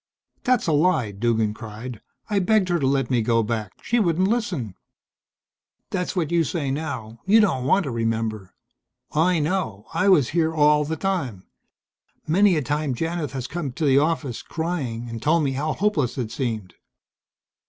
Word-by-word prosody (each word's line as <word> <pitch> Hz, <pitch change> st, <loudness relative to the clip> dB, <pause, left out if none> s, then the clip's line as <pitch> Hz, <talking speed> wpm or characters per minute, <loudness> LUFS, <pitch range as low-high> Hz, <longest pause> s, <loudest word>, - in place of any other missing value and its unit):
"That's 250 Hz, 0 st, +2 dB
a 165 Hz, -, +1 dB
lie," 150 Hz, -, +2 dB
Duggan 110 Hz, +1 st, 0 dB
cried. 110 Hz, +1 st, -8 dB, 0.3 s
"I 205 Hz, -2 st, +1 dB
begged 195 Hz, 0 st, +2 dB
her 175 Hz, -1 st, +2 dB
to 135 Hz, -, +1 dB
let 135 Hz, -2 st, +1 dB
me 120 Hz, -2 st, +3 dB
go 115 Hz, +1 st, +2 dB
back. 110 Hz, -3 st, -3 dB
She 240 Hz, -, +1 dB
wouldn't 185 Hz, -2 st, +2 dB
listen." 180 Hz, -, -1 dB, 1.2 s
"That's 180 Hz, 0 st, -2 dB
what 170 Hz, -4 st, -1 dB
you 170 Hz, -1 st, +3 dB
say 145 Hz, -3 st, -2 dB
now. 130 Hz, -7 st, -4 dB
You 215 Hz, +3 st, +6 dB
don't 165 Hz, -, +2 dB
want 190 Hz, +9 st, +3 dB
to 140 Hz, -, -4 dB
remember. 115 Hz, -4 st, -2 dB, 0.6 s
I 170 Hz, +3 st, +3 dB
know. 150 Hz, -, -1 dB
I 185 Hz, +5 st, +2 dB
was 150 Hz, -10 st, +5 dB
here 160 Hz, -1 st, +1 dB
all 150 Hz, 0 st, +4 dB
the 160 Hz, +2 st, -3 dB
time. 150 Hz, -, -2 dB, 0.8 s
Many 190 Hz, +4 st, +4 dB
a 150 Hz, -, 0 dB
time 145 Hz, 0 st, -1 dB
Janith 165 Hz, +1 st, -3 dB
has 130 Hz, -2 st, -4 dB
come 145 Hz, -2 st, -4 dB
to 160 Hz, +3 st, -2 dB
the 135 Hz, -1 st, +5 dB
office, 150 Hz, -5 st, -1 dB
crying, 145 Hz, -9 st, -3 dB
and 115 Hz, -1 st, -6 dB
told 155 Hz, +3 st, +3 dB
me 140 Hz, -, +1 dB
how 150 Hz, +4 st, -1 dB
hopeless 160 Hz, -, 0 dB
it 120 Hz, -4 st, -3 dB
seemed." 110 Hz, -8 st, -3 dB
145 Hz, 175 wpm, -23 LUFS, 115-170 Hz, 1.2 s, You